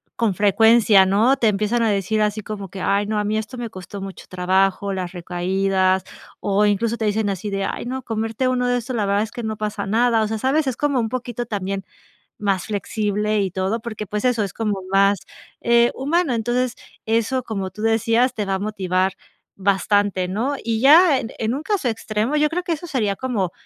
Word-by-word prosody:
con 225 Hz, -4 st, +1 dB
frecuencia, 210 Hz, 0 st, +5 dB
¿no?, 225 Hz, +8 st, +3 dB
te 230 Hz, -, +2 dB
empiezan 210 Hz, +3 st, +1 dB
a 225 Hz, -, +2 dB
decir 205 Hz, +1 st, 0 dB
así 210 Hz, 0 st, 0 dB
como 200 Hz, -2 st, -6 dB
que: 195 Hz, -, -8 dB
"Ay, 200 Hz, +2 st, +1 dB
no, 215 Hz, 0 st, -1 dB
a 210 Hz, -, +1 dB
mí 210 Hz, +1 st, -1 dB
esto 220 Hz, +4 st, -5 dB
me 240 Hz, -1 st, -4 dB
costó 190 Hz, 0 st, -8 dB
mucho 195 Hz, -1 st, -8 dB
trabajo, 190 Hz, +2 st, +1 dB
las 185 Hz, -2 st, -4 dB
recaídas", 185 Hz, +1 st, 0 dB, 0.4 s
o 205 Hz, +1 st, +2 dB
incluso 225 Hz, +3 st, 0 dB
te 220 Hz, -, -2 dB
dicen 210 Hz, 0 st, 0 dB
así 195 Hz, +2 st, -4 dB
de: 195 Hz, 0 st, -2 dB
"Ay -, -, -4 dB
no, 260 Hz, +1 st, -4 dB
comerte 225 Hz, +2 st, -2 dB
uno 250 Hz, -1 st, +1 dB
de 245 Hz, 0 st, +2 dB
estos, 245 Hz, +1 st, -4 dB
la 215 Hz, -3 st, 0 dB
verdad 200 Hz, +1 st, +2 dB
es 220 Hz, -, -7 dB
que 245 Hz, -, -6 dB
no 220 Hz, -1 st, -3 dB
pasa 210 Hz, -1 st, -3 dB
nada", 230 Hz, +2 st, +3 dB
o -, -, 0 dB
sea, 220 Hz, +1 st, -2 dB
¿sabes?, 280 Hz, +6 st, +1 dB
es 260 Hz, -, -1 dB
como 285 Hz, -3 st, +1 dB
un 225 Hz, -1 st, -1 dB
poquito 245 Hz, -1 st, -4 dB
también 195 Hz, -2 st, -3 dB, 0.6 s
más 195 Hz, -3 st, 0 dB
flexible 210 Hz, 0 st, -1 dB
y 195 Hz, -, 0 dB
todo 190 Hz, +5 st, -1 dB
porque, 220 Hz, -2 st, -5 dB
pues, 210 Hz, +3 st, -3 dB
eso 240 Hz, -4 st, +2 dB
es 195 Hz, -, -5 dB
como 210 Hz, -4 st, -2 dB
más 195 Hz, +1 st, +4 dB, 0.4 s
eh, 235 Hz, 0 st, +4 dB
humano, 305 Hz, +2 st, +1 dB
entonces 240 Hz, +2 st, 0 dB, 0.3 s
eso 230 Hz, +3 st, +1 dB
como 195 Hz, -5 st, -4 dB
tú 210 Hz, -, -10 dB
decías, 230 Hz, +3 st, +2 dB
te 210 Hz, -, -2 dB
va 195 Hz, 0 st, 0 dB
a 190 Hz, -, -3 dB
motivar 190 Hz, -2 st, 0 dB, 0.5 s
bastante, 200 Hz, -1 st, +1 dB
¿no? 235 Hz, +9 st, -1 dB
Y 225 Hz, -1 st, -1 dB
ya 295 Hz, +3 st, +6 dB
en 225 Hz, -, -6 dB
en 225 Hz, +1 st, 0 dB
un 290 Hz, -, -5 dB
caso 380 Hz, -, 0 dB
extremo, 220 Hz, +4 st, -2 dB
yo 300 Hz, 0 st, +3 dB
creo 355 Hz, +2 st, -1 dB
que 350 Hz, -, -3 dB
eso 325 Hz, +3 st, -6 dB
sería 215 Hz, -9 st, 0 dB
como 220 Hz, -9 st, -1 dB
215 Hz, 215 wpm, -21 LUFS, 195-240 Hz, 0.6 s, ya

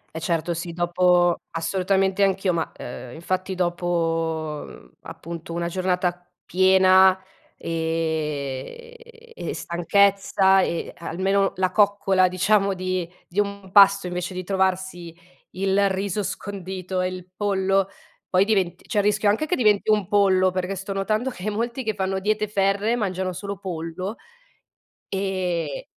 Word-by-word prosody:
Eh -, -, -2 dB
certo, 165 Hz, +1 st, -1 dB
sì, 170 Hz, +1 st, -5 dB
dopo 175 Hz, 0 st, +3 dB, 0.2 s
assolutamente 190 Hz, +3 st, +1 dB
anch'io, 195 Hz, -1 st, +1 dB
ma, 165 Hz, -2 st, -2 dB
uhm, 125 Hz, 0 st, -8 dB
infatti 185 Hz, +3 st, -3 dB
dopo, 165 Hz, -3 st, -1 dB
mhmm, 60 Hz, -1 st, -14 dB
appunto 170 Hz, 0 st, -8 dB
una 170 Hz, 0 st, -2 dB
giornata 180 Hz, -1 st, -1 dB, 0.2 s
piena, 190 Hz, 0 st, +5 dB, 0.4 s
ehm, 160 Hz, -, -3 dB, 0.4 s
e -, -, -5 dB
stanchezza 195 Hz, +2 st, +3 dB
e 170 Hz, -2 st, -2 dB
almeno 195 Hz, +4 st, 0 dB
la 185 Hz, 0 st, +1 dB
coccola 200 Hz, -3 st, +3 dB
diciamo 195 Hz, +2 st, +2 dB
di 185 Hz, -2 st, -2 dB, 0.2 s
di 180 Hz, -, -8 dB
un 200 Hz, -2 st, -2 dB
pasto 200 Hz, -1 st, +6 dB
invece 180 Hz, +1 st, -4 dB
di 185 Hz, -, -4 dB
trovarsi 185 Hz, -2 st, -1 dB, 0.4 s
il 195 Hz, +1 st, +1 dB
riso 200 Hz, +1 st, -2 dB
scondito 190 Hz, -1 st, -4 dB
e -, -, 0 dB
il 185 Hz, -1 st, -6 dB
pollo, 195 Hz, -1 st, +1 dB, 0.4 s
poi 185 Hz, +1 st, +3 dB
diventi 195 Hz, -5 st, 0 dB
c'è 210 Hz, -, -1 dB
il 205 Hz, -, +3 dB
rischio 210 Hz, 0 st, +2 dB
anche 220 Hz, +10 st, +1 dB
che 360 Hz, -, 0 dB
diventi 215 Hz, -, +3 dB
un 210 Hz, -4 st, +1 dB
pollo, 190 Hz, -3 st, +4 dB
perché 185 Hz, +1 st, -3 dB
sto 195 Hz, +1 st, -5 dB
notando 215 Hz, +6 st, -1 dB
che 205 Hz, -4 st, -6 dB
molti 235 Hz, +4 st, -3 dB
che 220 Hz, -1 st, -1 dB
fanno 190 Hz, -1 st, -1 dB
diete 215 Hz, +2 st, 0 dB
ferree 200 Hz, +3 st, +1 dB
mangiano 190 Hz, -4 st, -2 dB
solo 200 Hz, +2 st, -6 dB
pollo. 185 Hz, +2 st, -5 dB, 0.9 s
E 185 Hz, -6 st, -2 dB
190 Hz, 135 wpm, -23 LUFS, 175-200 Hz, 0.9 s, pasto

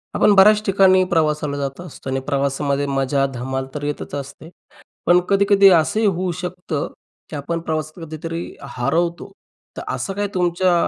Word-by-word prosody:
आपण 210 Hz, -, +4 dB
बऱ्याच 210 Hz, +2 st, +7 dB
ठिकाणी 190 Hz, -1 st, +5 dB
प्रवासाला 150 Hz, -3 st, +1 dB
जात 140 Hz, +1 st, -4 dB
असतो 160 Hz, -6 st, -9 dB
आणि 135 Hz, 0 st, -1 dB
प्रवासामध्ये 140 Hz, 0 st, 0 dB
मजा, 135 Hz, 0 st, 0 dB
धमाल 130 Hz, +2 st, -3 dB
तर 145 Hz, -, -4 dB
येतच 145 Hz, -1 st, -4 dB
असते. 140 Hz, +3 st, -8 dB, 0.6 s
पण 175 Hz, +1 st, +6 dB
कधी-कधी 200 Hz, 0 st, +5 dB
असंही 215 Hz, +8 st, 0 dB
होऊ 185 Hz, -2 st, 0 dB
शकतं, 180 Hz, -4 st, -4 dB, 0.4 s
की 155 Hz, -, -5 dB
आपण 165 Hz, +4 st, -3 dB
प्रवासात 155 Hz, +1 st, -3 dB
कधीतरी 165 Hz, +2 st, -5 dB, 0.3 s
हरवतो. 170 Hz, +9 st, -1 dB, 0.5 s
तर -, -, -5 dB
असं 195 Hz, -, -3 dB
काय 205 Hz, +1 st, -1 dB
तुमच्या 180 Hz, 0 st, +2 dB
160 Hz, 150 wpm, -20 LUFS, 140-185 Hz, 0.6 s, बऱ्याच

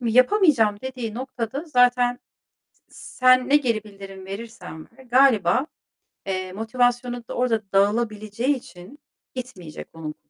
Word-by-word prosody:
M 240 Hz, -, -4 dB
yapamayacağım 250 Hz, -, +4 dB
dediği 250 Hz, -4 st, -5 dB
noktada 260 Hz, +2 st, -4 dB
zaten, 245 Hz, -3 st, +3 dB, 0.5 s
s -, -, -15 dB
sen 255 Hz, 0 st, +5 dB
ne 290 Hz, -, +7 dB
geri 230 Hz, -7 st, -1 dB
bildirim 195 Hz, -2 st, -11 dB
verirsen 195 Hz, -5 st, -8 dB
ver, 265 Hz, -, -15 dB
galiba, 255 Hz, 0 st, +3 dB, 0.6 s
eee, 185 Hz, -1 st, -3 dB
motivasyonu 245 Hz, +2 st, -1 dB
da -, -, -6 dB
orada 240 Hz, -3 st, +1 dB
dağılabileceği 215 Hz, +5 st, +1 dB
için 215 Hz, +1 st, -12 dB, 0.4 s
gitmeyecek 185 Hz, -11 st, -8 dB
onun. 155 Hz, -2 st, -7 dB
235 Hz, 120 wpm, -23 LUFS, 205-255 Hz, 0.6 s, ne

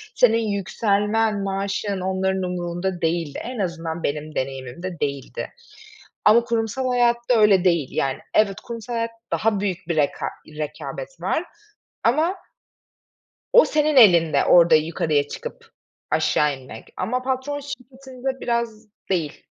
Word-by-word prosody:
Senin 230 Hz, -2 st, +5 dB
yükselmen, 205 Hz, +2 st, +1 dB
maaşın, 195 Hz, 0 st, -2 dB
onların 190 Hz, 0 st, 0 dB
umurunda 175 Hz, 0 st, -3 dB
değildi. 165 Hz, -2 st, -1 dB
En 245 Hz, -1 st, -6 dB
azından 170 Hz, -3 st, -3 dB
benim 150 Hz, +1 st, -3 dB
deneyimimde 135 Hz, +7 st, -4 dB
değildi 140 Hz, -2 st, -3 dB, 0.8 s
ama 225 Hz, +3 st, +6 dB
kurumsal 235 Hz, +2 st, -1 dB
hayatta 240 Hz, -1 st, +2 dB
öyle 200 Hz, -4 st, +5 dB
değil. 170 Hz, -6 st, +3 dB
Yani, 135 Hz, -1 st, -1 dB, 0.2 s
evet, 200 Hz, -2 st, +3 dB
kurumsal 235 Hz, 0 st, -7 dB
hayat 230 Hz, 0 st, -1 dB, 0.2 s
daha 215 Hz, -2 st, +1 dB
büyük 190 Hz, -3 st, -1 dB
bir 170 Hz, -, +1 dB
reka 145 Hz, -2 st, +1 dB, 0.2 s
rekabet 155 Hz, -, -7 dB
var -, -, 0 dB, 0.6 s
ama 310 Hz, +10 st, +3 dB, 1.2 s
o -, -, +8 dB
senin 305 Hz, 0 st, +1 dB
elinde 175 Hz, -, +6 dB
orada 170 Hz, -2 st, +7 dB
yukarıya 155 Hz, -2 st, +1 dB
çıkıp -, -, -8 dB, 0.4 s
aşağı 150 Hz, -2 st, +2 dB
inmek 130 Hz, -4 st, -12 dB
ama 250 Hz, +2 st, -1 dB
patron 265 Hz, +3 st, -2 dB
şirketinde 265 Hz, -1 st, -7 dB
biraz 235 Hz, -3 st, -2 dB, 0.2 s
değil. 165 Hz, -6 st, -2 dB
200 Hz, 125 wpm, -23 LUFS, 165-235 Hz, 1.2 s, o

